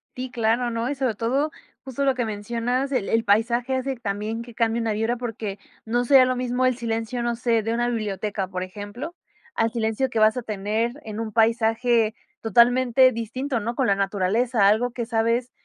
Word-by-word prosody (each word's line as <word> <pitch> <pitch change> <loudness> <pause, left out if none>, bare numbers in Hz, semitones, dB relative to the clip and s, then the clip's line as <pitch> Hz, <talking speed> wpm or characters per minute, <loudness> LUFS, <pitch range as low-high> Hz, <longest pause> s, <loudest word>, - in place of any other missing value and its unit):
Sí, 255 0 -5
claro, 235 +1 +1
¿no? 230 +2 -2
Y 285 - -2
sobre 260 -4 0
todo, 270 +8 0 0.3
justo 270 +1 -3
lo 270 -2 +2
que 245 - -1
mencionas, 235 +5 -2
el 250 -7 0
el 225 0 +2
paisaje 235 +5 +2
hace 265 +1 -2
también 215 0 -3
que 235 -1 -11
cambie 230 0 +1
una 225 -2 0
vibra 225 +3 0
porque, 220 -4 -5 0.3
no 240 +2 0
sería 265 0 +7
lo 255 0 0
mismo 250 +1 0
el 255 - +2
silencio, 230 0 -3
no 235 0 -1
sé 230 -1 +1
de 225 +2 -2
una 240 +1 0
biblioteca, 210 -3 -2
por 185 0 -4
ejemplo, 205 - -7 0.4
al 225 0 +1
silencio 230 +3 -1
que 230 - -4
vas 215 +1 +5
a - - -1
tener 215 +2 -1
en 215 0 -6
un 225 -1 -4
paisaje, 225 0 +2 0.3
totalmente 245 +3 +4
distinto, 235 +3 -3
¿no?, 235 +3 -3
con 265 - +1
la 200 - +3
naturaleza, 200 +3 +1
algo 230 +4 +2
que 235 -1 -4
sabes, 230 +2 0
230 Hz, 195 wpm, -24 LUFS, 220-250 Hz, 0.4 s, sería